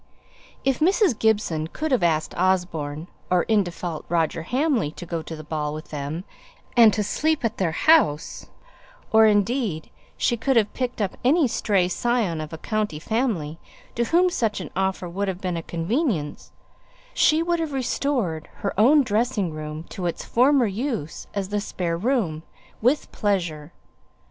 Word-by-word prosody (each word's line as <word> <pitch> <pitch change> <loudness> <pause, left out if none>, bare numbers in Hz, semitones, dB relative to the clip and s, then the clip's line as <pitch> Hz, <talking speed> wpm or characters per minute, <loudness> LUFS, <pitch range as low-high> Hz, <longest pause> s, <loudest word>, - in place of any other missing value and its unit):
If 270 -1 +2
Mrs. 365 - +3
Gibson 205 -8 +1
could 310 - -4
have 255 - +3
asked 160 -2 +1
Osborne, 170 -5 0 0.2
or 180 -1 +3
in 220 -2 +3
default, 175 -2 -5
Roger 165 -1 0
Hamley 250 - 0
to 175 - -8
go 170 -1 -3
to 160 - -7
the 155 - -9
ball 150 -1 -3
with 155 - -9
them 150 +3 -4 0.5
and 230 -3 +8
to 210 - 0
sleep 310 +6 0
at 225 - -1
their 180 -4 0
house, 165 - +2 0.6
or 220 0 +7
if, - - +5
indeed, 205 - -1 0.3
she 240 - +1
could 265 +4 +1
have 215 -2 +2
picked 250 -4 -2
up 190 - -3
any 290 +3 +4
stray 200 -5 +1
scion 205 -4 0
of 155 - -7
a 160 - -6
"county 210 -2 -2
family" 170 - -2 0.3
to 235 - 0
whom 355 +6 +3
such 225 - 0
an 185 - -7
offer 190 -1 -1
would 195 +4 -3
have 185 -2 -3
been 185 -2 -2
a 165 - -2
convenience, 170 - -2 0.6
she 315 +2 +3
would 345 0 0
have 320 -2 -2
restored 250 - -1
her 200 - -3
own 280 +7 +6
dressing 215 -5 0
room 155 0 -6
to 180 -2 -4
its 170 - -4
former 260 +1 +4
use 215 - -3
as 195 -2 -2
the 205 0 -1
spare 175 -4 -2
room, 190 - 0 0.4
with 255 +7 +1
pleasure. 170 -7 -1
200 Hz, 170 wpm, -24 LUFS, 165-245 Hz, 0.6 s, and